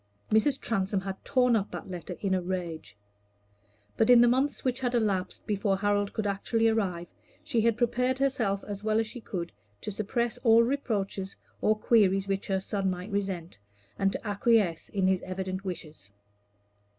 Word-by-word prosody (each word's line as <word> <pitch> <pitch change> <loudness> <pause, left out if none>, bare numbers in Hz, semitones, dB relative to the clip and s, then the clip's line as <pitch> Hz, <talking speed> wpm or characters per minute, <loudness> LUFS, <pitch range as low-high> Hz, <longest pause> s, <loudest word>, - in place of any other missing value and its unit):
Mrs. 235 +6 +3
Transome 195 -3 -1
had 195 0 -6
torn 250 -3 +3
up 205 -2 0
that - - -7
letter 180 -1 -6
in 195 -2 0
a 185 - +1
rage. 170 - -5 1.0
But 225 - +3
in 245 -1 +9
the 240 - +6
months 265 +4 +1
which 255 0 0
had 245 -1 -1
elapsed 195 -5 -1
before 200 -1 0
Harold 205 0 +1
could 220 - -3
actually 215 +3 +1
arrive, 190 -6 -1 0.4
she 230 - 0
had 230 0 +2
prepared 250 +2 +1
herself 235 -8 0
as 205 0 -7
well 215 0 +2
as 225 - +1
she 230 +3 -8
could 175 -5 -5 0.3
to - - -4
suppress 215 +3 -1
all 230 -1 +6
reproaches 205 -7 -2 0.3
or 215 0 +3
queries 200 -4 +3
which 195 0 -2
her 190 -1 +1
son 195 0 -1
might 180 +3 -5
resent, 190 - -3 0.4
and 195 0 +2
to - - -5
acquiesce 205 -5 +2
in 195 -2 0
his 190 -1 +2
evident 185 +1 -4
wishes. 155 - -7
205 Hz, 175 wpm, -28 LUFS, 190-230 Hz, 1.0 s, in